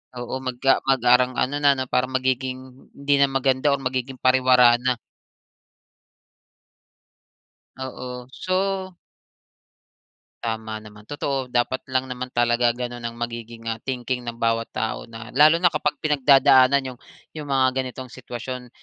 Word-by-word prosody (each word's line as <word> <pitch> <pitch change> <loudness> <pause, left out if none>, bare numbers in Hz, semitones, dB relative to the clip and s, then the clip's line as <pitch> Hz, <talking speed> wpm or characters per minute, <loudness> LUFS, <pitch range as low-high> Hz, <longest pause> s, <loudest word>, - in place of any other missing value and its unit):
Oo, 120 +1 -5
mag 130 -1 -3 0.2
ah, - - +3
mag 135 -1 +3
parang 125 +1 +4
ano 130 +3 0
na 140 -2 +3
parang 125 0 -1
magiging 130 0 -3
hindi 140 +1 0
na 140 - +5
maganda, 135 0 0
or - - -8
magiging 130 0 -3
pariwara 125 -2 +4
na. 125 0 0 2.8
Oo, 125 -1 -7
so 190 +1 -2 1.5
Tama 110 -1 -3
naman. 105 -1 -13
Totoo 140 -3 -3
dapat 125 +1 0
lang 130 0 0
naman 125 0 -6
talaga 120 0 +2
ganun 120 0 -5
ang 115 0 -6
magiging, 115 -1 -6
ah, 115 -1 -3
thinking 125 -1 -3
ng 120 -1 -7
bawat 115 0 0
tao 110 +1 -4
na 115 +1 -10
lalo 150 +4 +6
na 175 0 +2
kapag 150 -1 -1
pinagdadaanan 135 -2 +4
'yong 125 - -21 0.3
'yong 150 -2 -7
mga 135 -1 +3
ganitong 130 0 -7
sitwasyon. 125 0 -7
130 Hz, 135 wpm, -23 LUFS, 120-135 Hz, 2.8 s, lalo